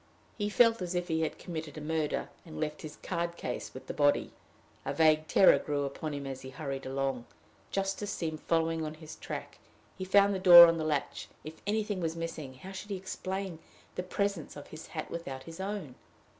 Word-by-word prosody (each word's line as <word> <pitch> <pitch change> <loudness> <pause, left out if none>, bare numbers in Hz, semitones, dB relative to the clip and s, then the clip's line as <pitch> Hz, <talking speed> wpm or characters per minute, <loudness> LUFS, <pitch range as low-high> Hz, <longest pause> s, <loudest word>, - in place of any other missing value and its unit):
He 205 -2 -1
felt 230 0 +4
as 180 0 -3
if 175 0 -1
he 160 0 +1
had 160 - -1
committed 160 -4 -6
a - - -3
murder, 155 0 -1
and 155 -3 -9
left 150 -1 -3
his 155 -1 -8
card 170 -1 -2
case 125 - -4
with 130 - -10
the - - -5
body. 145 -1 +2 0.5
A - - -3
vague 155 -1 +4
terror 190 - +6
grew 145 -1 -1
upon 140 +3 -4
him 140 -1 -5
as 135 -1 -5
he 130 - -8
hurried 135 -2 -5
along. 135 -2 -2 0.4
Justice 195 +1 -2
seemed 160 -5 -3
following 165 -1 +1
on 155 0 -4
his 155 0 -10
track. - - -7 0.4
He - - -2
had 185 - -16
found 200 0 +6
the 190 - -1
door 175 -2 +12
on 165 -1 +2
the - - -1
latch: 150 -3 -2 0.2
if 155 +1 -9
anything 210 -2 0
was 165 -1 -1
missing, 160 -5 -5
how 185 +9 -10
should 195 +2 -8
he 200 - -2
explain 190 -1 -4 0.3
the - - -2
presence 195 -2 -2
of 145 - -10
his 155 0 -9
hat - - -6
without 135 -6 -5
his 165 +4 -10
own? 190 -8 -4
160 Hz, 210 wpm, -31 LUFS, 150-185 Hz, 0.5 s, door